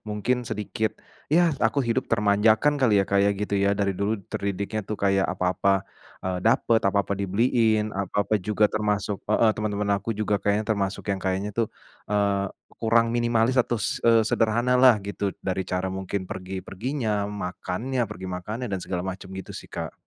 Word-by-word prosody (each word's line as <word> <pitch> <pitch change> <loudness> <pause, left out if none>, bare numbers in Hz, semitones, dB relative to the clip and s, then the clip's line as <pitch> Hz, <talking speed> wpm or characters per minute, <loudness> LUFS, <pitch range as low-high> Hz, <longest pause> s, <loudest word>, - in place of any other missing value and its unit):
mungkin 120 +4 -1
sedikit, 105 +1 -2 0.4
ya 175 +2 +6 0.2
aku 110 +5 +2
hidup 115 - +1
termanjakan 105 +6 +3
kali 105 -6 +4
ya, - - +1
Kak, 100 - +2
ya, 100 - +4
gitu 100 0 -3
ya, 100 0 +3
dari 100 -1 +1
dulu 100 +2 0 0.2
terdidiknya 100 +2 -2
tuh 105 - -2
kayak 95 -1 +3
apa-apa, 90 +2 0 0.6
eee, 95 -1 -1
dapet, 115 -1 +3
apa-apa 100 0 +1
dibeliin, 110 +2 +2
apa-apa 100 +2 -1
juga 105 +3 +1
termasuk 105 -1 -1
heeh, 110 +1 +4
teman-teman 105 -1 -1
aku 100 +3 -4
juga 105 -1 0
kayaknya 105 +1 +1
termasuk 100 -2 -1
yang 95 - -3
kayaknya 95 +2 -1
tuh, 115 - +2 0.4
eee, 100 -1 +1 0.3
kurang 115 0 +3
minimalis 120 +1 +2
atau 120 - -1
se 105 - -2
eee, 115 -1 +5
sederhana 115 +3 +2
lah 130 -3 +7
gitu, 100 -1 -2
dari 95 0 -1
cara 90 +1 -1
mungkin 95 0 -3
pergi-perginya, 100 +4 -3
makannya, 105 +5 -3
pergi 95 -3 -7
makannya 105 +7 -4
dan 95 - -1
segala 90 -1 -3
macam, 95 0 -6
gitu 95 0 -7
sih, - - -10
Kak. - - -5
105 Hz, 165 wpm, -25 LUFS, 100-110 Hz, 0.6 s, lah